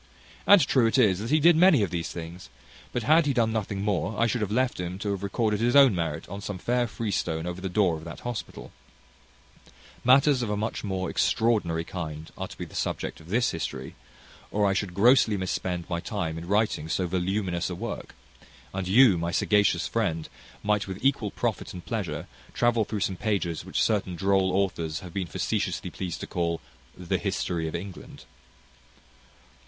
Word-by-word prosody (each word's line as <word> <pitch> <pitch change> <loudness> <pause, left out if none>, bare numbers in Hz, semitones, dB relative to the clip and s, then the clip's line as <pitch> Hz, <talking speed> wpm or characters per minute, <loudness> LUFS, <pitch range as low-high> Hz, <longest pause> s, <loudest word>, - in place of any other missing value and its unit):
And 200 -7 +8
true 130 -5 +3
it 115 - +1
is 100 -8 +4
that 110 +3 -4
he 155 +2 +4
did 170 +2 +6
many 175 - +6
of 95 - -2
these 85 -2 -2
things; 85 -2 -8 0.4
but 120 - -2
had 155 +4 +4
he 140 - +2
done 115 -3 +2
nothing 100 -2 -2
more 100 0 -1
I 115 - +4
should 120 0 0
have 105 - -1
left 125 0 +1
him 90 +1 -4
to 100 +1 -2
have 100 -1 -3
recorded 105 +1 0
his 120 +3 +2
own 135 -5 +8
merit 80 -3 -3
on 100 +2 -7
some 100 -1 -5
fair 120 +5 0
freestone 90 -8 -2
over 90 +1 -5
the 95 - -3
door 90 -3 +2
of 80 - -11
that 85 - -8
hospital. 120 -2 -6 1.3
Matters 135 +1 +5
of 120 - -2
a 105 - -1
much 110 +2 -3
more 95 -2 -2
extraordinary 105 -8 +1
kind 80 -3 -6
are - - -5
to - - -12
be - - -5
the - - -16
subject - - -3
of 80 - -15
this 120 +5 +2
history, 80 - -5 0.6
or 105 0 +1
I 100 - +3
should 95 -2 -2
grossly 110 0 +5
mis 95 0 -2
spend 90 -2 -3
my 85 -1 -2
time 95 -6 -3
in 85 +1 -7
writing 100 -6 +1
so 90 - 0
voluminous 90 0 -1
a 90 - -4
work; 110 +4 -6 0.6
and 95 -1 -3
you, 105 -2 +6
my 85 0 -1
sagacious 90 -2 +2
friend, 85 -8 -1 0.4
might 105 -1 +1
with 95 -1 -5
equal 130 -6 +2
profit - - -3
and 90 - -9
pleasure - - -3 0.3
travel 120 -2 +2
through 105 -1 -4
some 95 -1 -1
pages 95 -7 -1
which - - 0
certain 100 -5 0
droll 95 +1 +2
authors 90 -5 -1
have 90 -2 -10
been 95 -3 -2
facetiously - - -2
pleased 85 -3 -5
to - - -3
call 85 -1 -1 0.4
The 90 -2 -2
History 85 -2 -2
of 80 - -4
England. 95 +2 -8
100 Hz, 195 wpm, -27 LUFS, 85-115 Hz, 1.3 s, And